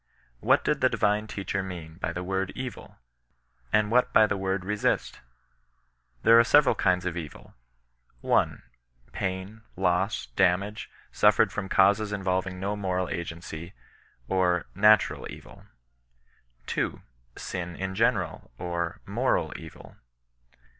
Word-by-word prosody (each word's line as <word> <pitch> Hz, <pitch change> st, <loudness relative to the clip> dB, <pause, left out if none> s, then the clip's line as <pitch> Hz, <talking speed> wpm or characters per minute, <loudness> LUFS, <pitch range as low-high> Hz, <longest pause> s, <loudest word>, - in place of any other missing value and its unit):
What -, -, +3 dB
did -, -, 0 dB
the -, -, +5 dB
divine 105 Hz, +1 st, +1 dB
teacher 100 Hz, -1 st, -3 dB
mean 85 Hz, -4 st, -8 dB
by 85 Hz, -, -2 dB
the 90 Hz, +1 st, -5 dB
word 95 Hz, +1 st, -2 dB
" -, -, -27 dB
m^," 130 Hz, -2 st, -7 dB, 0.8 s
and 105 Hz, 0 st, +2 dB
what 125 Hz, +1 st, +3 dB
by 110 Hz, -, +6 dB
the 105 Hz, -, -1 dB
word 95 Hz, -1 st, -2 dB
resist 105 Hz, +1 st, 0 dB
V^ -, -, -16 dB, 1.0 s
There 115 Hz, 0 st, +7 dB
are -, -, +7 dB
several 145 Hz, +3 st, +5 dB
kinds 90 Hz, -1 st, +1 dB
of 90 Hz, -2 st, -2 dB
evil, 80 Hz, -4 st, -8 dB, 0.7 s
1. -, -, +1 dB, 0.5 s
Pain, 95 Hz, +4 st, -4 dB
loss, 95 Hz, +2 st, 0 dB
damage, 100 Hz, +3 st, +1 dB, 0.2 s
suffered 105 Hz, 0 st, +4 dB
from 95 Hz, -2 st, -4 dB
causes 100 Hz, +2 st, +3 dB
involving 95 Hz, -2 st, -2 dB
no 100 Hz, +2 st, -2 dB
moral 95 Hz, -2 st, -2 dB
agency, 85 Hz, +1 st, -6 dB, 0.5 s
or 90 Hz, -2 st, +1 dB
natural 105 Hz, +2 st, +4 dB
evil, -, -, -12 dB, 1.0 s
2. -, -, -2 dB, 0.3 s
Sin 90 Hz, -2 st, -5 dB
in 95 Hz, +1 st, -4 dB
general, 110 Hz, -3 st, 0 dB
or 85 Hz, -1 st, -3 dB
moral -, -, 0 dB
eoil. -, -, -11 dB
95 Hz, 130 wpm, -27 LUFS, 90-105 Hz, 1.0 s, There